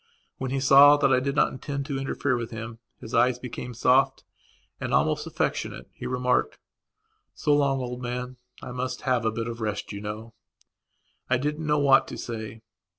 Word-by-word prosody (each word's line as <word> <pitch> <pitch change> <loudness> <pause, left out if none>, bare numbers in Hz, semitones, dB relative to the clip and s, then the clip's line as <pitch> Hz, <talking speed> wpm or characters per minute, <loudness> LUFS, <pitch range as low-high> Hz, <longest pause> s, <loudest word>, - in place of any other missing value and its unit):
When 130 - -3
he 135 +1 -1
saw 140 +2 +8
that 140 -2 +3
I - - +4
did 140 +2 -2
not - - +3
intend 140 +1 -5
to 140 -2 -3
interfere 135 0 -1
with 120 -1 -4
him 115 0 -7 0.2
his 110 - -10
eyes 120 +1 +3
became 125 0 -7
soft 130 +3 +3 0.6
and - - -1
almost - - +1
affectionate. - - -3
He - - -7
remarked: 125 0 0 0.8
"So 150 - +1
long, 140 -2 +2
old 125 0 -5
man, 125 +1 -4 0.3
I - - -6
must 125 +1 -4
have 125 -3 0
a 110 - +2
bit 115 +1 -4
of 115 0 -5
a - - -4
rest, 105 -2 -3
you 100 -1 -6
know." 110 +2 -6 1.0
I 130 - +3
didn't 150 +4 -3
know 150 0 +3
what 140 -2 +5
to - - -7
say. 110 -1 -6
125 Hz, 190 wpm, -26 LUFS, 115-135 Hz, 1.0 s, saw